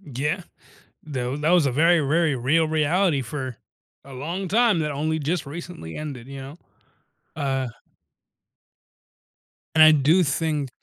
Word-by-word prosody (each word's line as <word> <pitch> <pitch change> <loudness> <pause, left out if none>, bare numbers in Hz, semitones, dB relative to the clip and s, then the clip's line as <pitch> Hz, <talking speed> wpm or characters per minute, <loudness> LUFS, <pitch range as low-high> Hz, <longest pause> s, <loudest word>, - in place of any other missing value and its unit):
Yeah. 150 +6 -2 0.6
Tha 130 -3 -3
that 155 - +1
was 175 -5 +4
a 130 - 0
very, 165 +4 +4
very 155 +1 +1
real 145 +6 +2
reality 160 0 +1
for 130 -1 -5 0.5
a 135 - -12
long 170 +8 -4
time 220 -2 +3
that 150 -1 -1
only 155 +3 -1
just 155 +1 -2
recently 160 - -8
ended, 135 -6 -6
you 135 -1 -8
know? 140 +4 -9 0.8
Uh. 135 -3 -1 2.1
And 155 - +7
I 155 - +8
do 155 +5 +4
think 150 -1 -1
150 Hz, 140 wpm, -24 LUFS, 135-165 Hz, 2.1 s, I